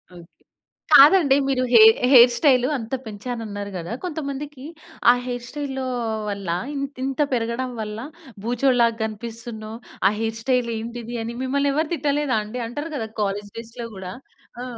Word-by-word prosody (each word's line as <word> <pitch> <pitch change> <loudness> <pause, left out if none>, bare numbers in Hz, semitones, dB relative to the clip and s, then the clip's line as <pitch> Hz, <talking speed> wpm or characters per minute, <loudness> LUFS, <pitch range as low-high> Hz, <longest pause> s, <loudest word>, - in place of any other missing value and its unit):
Okay. 170 -1 -16 0.5
కాదండి 285 -1 +8
మీరు 260 -2 +1
hair 220 -1 +8
hair 245 -1 +9
style 255 -4 +3
అంత 230 +1 -8
పెంచాను 225 +2 -6
అన్నారు 205 0 -6
గదా! 170 +2 -6
కొంతమందికి 290 -4 -5 0.5
ఆ - - +5
హెయిర్ 245 -1 -4
స్టైలు 275 -3 -4 0.5
వల్ల 200 -2 -5 0.3
ఇం 275 - -3 0.2
ఇంత 270 +2 -3
పెరగడం 235 +2 -1
వల్ల 210 +1 -5 0.5
భూచోడు 245 +2 +2
లాగా 230 -1 +2
కనిపిస్తున్నవు. 220 0 -7 0.3
ఆ - - +3
హెయిర్ 225 0 -2
స్టైల్ 250 -1 +1
ఏంటిది 235 +1 -6
అని 235 +1 -5
మిమ్మల్ని 280 +2 +1
ఎవరు 310 +1 0
తిట్టలేదా 290 -5 0
అండి. 245 +4 -6
అంటారు 290 +7 -6
కదా 225 -5 -3
కాలేజ్ 205 0 -2
డేస్‌లో 230 +1 -7
గూడా. 185 -1 -7 0.5
ఆ! - - -4
240 Hz, 150 wpm, -23 LUFS, 220-270 Hz, 0.5 s, హెయిర్